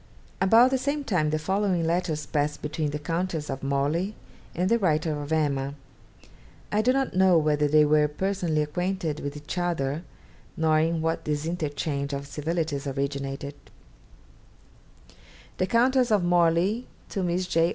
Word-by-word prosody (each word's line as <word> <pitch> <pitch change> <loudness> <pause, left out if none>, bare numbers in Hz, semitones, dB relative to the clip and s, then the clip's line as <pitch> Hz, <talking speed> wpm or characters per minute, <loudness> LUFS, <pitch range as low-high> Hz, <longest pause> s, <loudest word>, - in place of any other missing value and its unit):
About 225 +6 +6
the 265 - +1
same 285 +2 -1
time 175 - +1
the 155 - 0
following 190 +1 0
letters 165 -2 -1
passed 150 0 -1
between 150 0 -2
the 145 - -3
Countess 165 0 -2
of 135 - -5
Morley 145 +9 0 0.4
and 180 +2 +1
the 235 +3 +3
writer 155 -5 +1
of 145 +2 -7
'Emma.' 140 -3 0 1.0
I 210 - +2
do 245 +3 +3
not 270 0 0
know 185 -2 +5
whether 150 -1 +2
they 150 +1 +5
were 150 0 +4
personally 170 -1 -1
acquainted 170 0 -2
with 145 +1 -5
each 150 +4 -5
other, 160 -4 -1 0.6
nor 155 -1 +3
in 160 0 0
what 165 0 -1
this 150 0 -1
interchange 145 -3 -2
of 140 0 -4
civilities 150 0 -2
originated: 140 0 -3 2.1
_The 185 - 0
Countess 250 +2 +3
of 210 -4 +3
Morley 175 +6 +2 0.2
to 195 - -3
Miss 180 +1 0
J. 165 -1 +2
160 Hz, 150 wpm, -26 LUFS, 150-185 Hz, 2.1 s, About